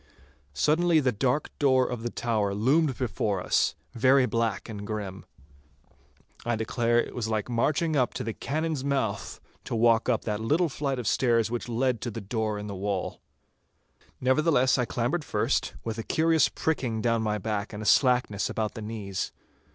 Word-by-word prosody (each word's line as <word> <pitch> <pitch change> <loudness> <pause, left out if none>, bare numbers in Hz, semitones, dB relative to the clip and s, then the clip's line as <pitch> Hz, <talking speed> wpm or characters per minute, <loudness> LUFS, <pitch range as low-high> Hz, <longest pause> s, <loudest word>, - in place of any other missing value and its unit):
Suddenly 160 - +3
the 130 -4 +2
dark 125 +6 0
door 130 -3 +4
of 125 -2 -4
the 120 - -2
tower 105 -5 -1
loomed 135 +6 +2
before 105 -5 -1
us, - - +1 0.2
very 130 +2 +4
black 115 -4 -1
and 105 -2 -7
grim. 100 -3 -5 1.2
I 120 0 0
declare 115 +1 +1
it - - -2
was 115 -3 -3
like 110 +1 -2
marching 155 +7 +1
up 125 -3 +1
to - - -3
the 115 - -3
cannon's 155 +1 -2
mouth 130 -8 -2 0.3
to - - -3
walk 115 +1 +3
up 115 -3 +1
that 105 -2 -2
little 155 +10 +1
flight 140 -1 -2
of 125 - -4
stairs 115 0 +2
which 120 0 -3
led 120 -1 0
to 125 - -3
the 115 - -6
door 110 0 -2
in 105 - -6
the 105 - -5
wall. 100 -1 -3 1.0
Nevertheless, 130 0 +3
I 125 - +2
clambered 125 +9 -1
first, - - 0
with 115 0 -4
a - - -3
curious 160 0 +3
pricking 125 -8 -1
down 115 0 +1
my 105 -1 0
back 105 0 -3
and 105 +1 -6
a - - -7
slackness 125 -5 +3
about 110 -1 -2
the 110 - -7
knees. 105 -3 -4
115 Hz, 175 wpm, -27 LUFS, 110-130 Hz, 1.2 s, door